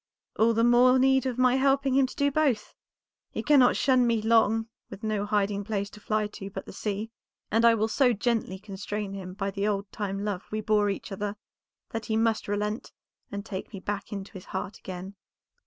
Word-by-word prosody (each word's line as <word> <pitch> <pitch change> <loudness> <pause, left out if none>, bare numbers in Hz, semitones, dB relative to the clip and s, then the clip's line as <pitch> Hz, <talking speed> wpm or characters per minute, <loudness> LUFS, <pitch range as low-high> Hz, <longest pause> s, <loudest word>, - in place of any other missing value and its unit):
"All 225 +1 +3
the 230 - +3
more 245 +2 +6
need 265 0 +3
of 250 -2 -3
my 255 0 +4
helping 270 0 +2
him 265 0 +4
to - - -11
do 285 0 +2
both. 275 -7 +1 0.6
He - - -4
cannot 275 -4 +5
shun 255 -2 +3
me 230 -1 +2
long 225 0 +3 0.2
with 195 +1 -10
no 210 -1 -1
hiding 205 -1 0
place 200 -1 -3
to 210 - -12
fly 215 0 0
to 205 -1 -7
but - - -7
the - - -10
sea, 210 +2 -3 0.4
and 225 +2 +3
I 230 -1 +7
will 220 0 +1
so 250 +3 +3
gently 225 -3 -1
constrain 205 0 -5
him 185 -2 -7
by 195 -1 -2
the 200 +1 -1
old 200 -1 -2
time 200 -1 -3
love 200 -3 -2
we 215 - -2
bore 210 -1 +2
each 200 +2 -4
other, 205 +1 -3 0.6
that 225 -1 -4
he 220 - +1
must 225 -1 +1
relent 210 +2 -2 0.4
and 200 0 -5
take 190 -4 -6
me 195 - -6
back 205 +1 -4
into 200 -1 -6
his 190 -3 -9
heart 190 +1 -5
again." 185 +1 -7
215 Hz, 205 wpm, -27 LUFS, 200-235 Hz, 0.6 s, I